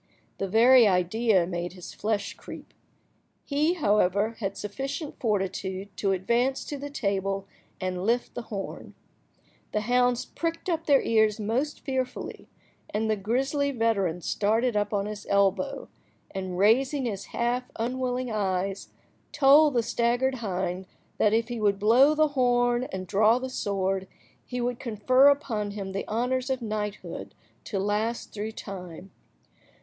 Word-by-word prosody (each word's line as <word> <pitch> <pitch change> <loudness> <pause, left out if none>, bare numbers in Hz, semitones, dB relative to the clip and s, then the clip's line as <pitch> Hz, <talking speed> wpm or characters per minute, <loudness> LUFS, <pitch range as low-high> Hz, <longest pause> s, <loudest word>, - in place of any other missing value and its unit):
The 195 - -1
very 235 +4 +6
idea 185 +1 +2
made 175 0 -4
his 180 -1 -10
flesh 210 -1 -2
creep. - - -11 0.7
He, 300 +4 +1
however, 205 - +2
had 195 -2 -3
sufficient 275 +8 -5
fortitude 195 -2 -2
to 195 +1 +1
advance 235 +8 0
to 290 - -5
the 285 +1 -5
table 195 -6 -1 0.3
and 185 -1 -3
lift 235 +4 0
the - - -4
horn. 200 -3 -6 0.8
The 210 - +1
hounds 245 +2 +2
pricked 330 +2 -4
up 325 -1 -2
their 280 -3 +5
ears 220 -1 +2
most 245 +8 -1
fearfully, 260 -2 -4 0.4
and 220 +1 0
the - - +2
grisly 270 +8 0
veteran 215 -9 0
started 225 +6 +1
up 205 0 0
on 200 -2 0
his 210 0 -7
elbow, 195 -1 +1 0.4
and 190 -2 -4
raising 260 +7 +3
his 200 -4 -3
half–unwilling 250 +1 -2
eyes, 195 -2 -2 0.4
told 290 0 +6
the 235 - +3
staggered 240 +3 +1
hind 185 -2 -3 0.3
that 210 - +4
if 225 +1 +1
he 240 -1 -4
would 205 -2 +2
blow 245 +9 +5
the 310 0 +3
horn 245 -2 +2
and 185 -1 -4
draw 215 +5 +4
the 260 0 -5
sword, 195 -4 -1 0.4
he 250 - -5
would 245 0 -2
confer 255 +4 +4
upon 240 -8 +1
him 200 -1 -5
the 195 - -4
honours 250 +4 -1
of 260 -1 0
knighthood 215 -3 -5 0.3
to 205 - -3
last 210 +4 -1
through 215 +1 -4
time. 185 -3 -8
220 Hz, 145 wpm, -27 LUFS, 195-255 Hz, 0.8 s, very